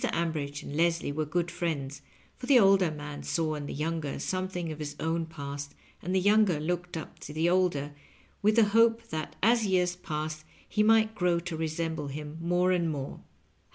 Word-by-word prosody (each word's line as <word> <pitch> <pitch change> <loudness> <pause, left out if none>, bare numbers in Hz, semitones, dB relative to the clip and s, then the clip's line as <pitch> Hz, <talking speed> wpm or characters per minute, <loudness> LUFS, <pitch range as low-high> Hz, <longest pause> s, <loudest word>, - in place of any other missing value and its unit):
Ambridge 150 -4 -2
and 145 - -7
Leslie 165 -1 +1
were 155 +1 -2
good 170 +2 -1
friends, 155 -6 -3 0.3
for 250 - -8
the 275 - +7
older 195 -5 +5
man 150 -1 -7
saw 160 -2 -1
in 145 -1 -5
the - - -5
younger 155 -1 -2
some 185 0 -2
thing 175 -3 -4
of 155 - -7
his 150 -1 -5
own 165 0 -1
past, 140 -2 -7 0.3
and 185 +3 -2
the - - +4
younger 205 -4 +4
looked 175 +2 -2
up 160 - -8
to - - -8
the 160 +3 +1
older 175 -6 +1 0.5
with 215 +1 +3
the 230 - +6
hope 230 +1 +4
that 155 -1 -4
as 230 0 +4
years 180 -2 +2
passed 155 -3 -4 0.2
he 210 - 0
might 220 0 +4
grow 180 -4 +1
to 170 -1 -5
resemble 160 -1 -2
him 150 +2 -6
more 175 +2 +2
and 175 -2 +1
more. 140 -3 -4
165 Hz, 190 wpm, -29 LUFS, 150-185 Hz, 0.5 s, the